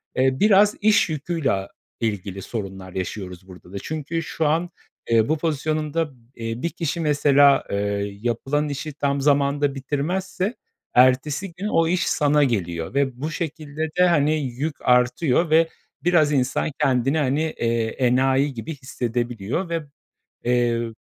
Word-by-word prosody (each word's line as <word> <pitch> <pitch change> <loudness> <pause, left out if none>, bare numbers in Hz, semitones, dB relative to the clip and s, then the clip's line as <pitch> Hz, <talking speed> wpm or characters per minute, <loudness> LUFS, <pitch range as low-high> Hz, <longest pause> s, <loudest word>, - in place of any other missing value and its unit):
eee, 130 0 +2
biraz 205 0 +5
iş 210 -4 +4
yüküyle 155 -1 -1
a 95 0 -2 0.3
ilgili 100 -3 -3
sorunlar 95 -4 -6
yaşıyoruz 95 0 -5
burada 90 -1 -14
da. - - -4
Çünkü 155 +5 -4
şu 160 - -2
an 165 +3 +1 0.4
eee 115 -1 +3
bu 155 - +2
pozisyonunda, 155 0 -1 0.2
eee, 115 +1 -5
bir 170 - 0
kişi 165 0 -3
mesela, 145 -2 +4
eee, 100 0 -2
yapılan 135 +6 -1
işi 145 +2 -5
tam 140 -1 -1
zamanında 140 0 +2
bitirmezse 180 - -2 0.4
ertesi 135 +8 +3
gün 195 +5 -4
o 165 -5 +2
iş 180 +1 +1
sana 150 -1 +3
geliyor 85 -9 -2
ve 135 -2 0
bu 155 +2 -2
şekilde 155 -1 -4
de, - - +7
hani, 155 -2 +3
yük 140 +4 -3
artıyor 125 +6 +2
ve 160 +1 +5 0.4
biraz 160 -4 +4
insan 135 +2 0
kendini, 135 +3 +2
hani, 145 0 +1
eee, 115 -7 -1
enayi 130 +3 +2
gibi 120 +7 -6
hissedebiliyor 120 - -3
ve, 165 -2 -2 0.6
eee, 120 -1 +2
ö 115 -1 -3
140 Hz, 145 wpm, -23 LUFS, 120-155 Hz, 0.6 s, de